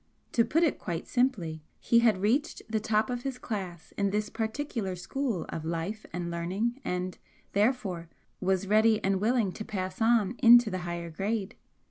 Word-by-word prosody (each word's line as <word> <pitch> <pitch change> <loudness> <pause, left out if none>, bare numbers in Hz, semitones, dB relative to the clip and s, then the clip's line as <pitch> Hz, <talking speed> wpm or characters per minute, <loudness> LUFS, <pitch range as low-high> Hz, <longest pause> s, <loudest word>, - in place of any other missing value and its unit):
To 230 - +4
put 310 +9 +2
it 320 - +1
quite 170 -2 -4
simply, 195 -12 0 0.2
he 235 - +4
had 220 -5 +3
reached 275 +10 +1
the 220 -1 0
top 215 +3 +1
of 245 -1 -2
his 265 -1 -4
class 190 -9 -6
in 200 0 +2
this 210 +1 -1
particular 220 -4 -3
school 195 - -2
of 160 - -4
life 170 +7 -3
and 175 0 -3
learning 195 +10 -2
and, 180 0 -3 0.3
therefore, 200 -6 0 0.3
was 190 0 +1
ready 215 +2 +4
and 195 0 +1
willing 225 -3 +2
to 215 - -6
pass 190 +2 -4
on 225 -2 +3
into 240 -2 +7
the 185 - -2
higher 170 -1 -5
grade. 200 +4 -2
210 Hz, 170 wpm, -29 LUFS, 180-235 Hz, 0.3 s, into